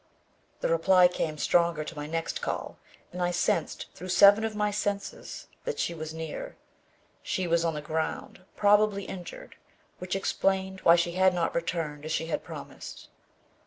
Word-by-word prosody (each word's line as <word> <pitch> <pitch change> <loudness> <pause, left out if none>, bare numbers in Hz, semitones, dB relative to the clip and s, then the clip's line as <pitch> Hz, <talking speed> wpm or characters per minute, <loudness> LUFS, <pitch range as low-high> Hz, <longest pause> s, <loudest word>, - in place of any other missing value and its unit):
The - - +1
reply 190 - +5
came 160 -3 -3
stronger 170 0 +2
to 165 - -8
my 145 0 -5
next 165 +1 -3
call - - -4 0.3
and 180 - -5
I 175 - +2
sensed 175 -2 0
through 185 +2 -8
seven 200 +4 +7
of 220 -1 -2
my 210 0 +1
senses 205 -1 -4 0.2
that 485 - -3
she 170 - -1
was 155 -1 -6
near. 160 -1 -6 0.7
She 185 - -2
was 170 -1 +2
on 165 -2 0
the 150 - -5
ground, 160 +3 -3
probably 205 -1 +4
injured, 190 - -9 0.4
which 180 +1 -3
explained 190 0 0
why 170 - +7
she 175 0 +1
had 185 +1 +3
not 170 -2 0
returned 165 -3 -2
as 155 - -5
she 160 - 0
had 165 - -3
promised. - - -9
175 Hz, 165 wpm, -28 LUFS, 165-195 Hz, 0.7 s, seven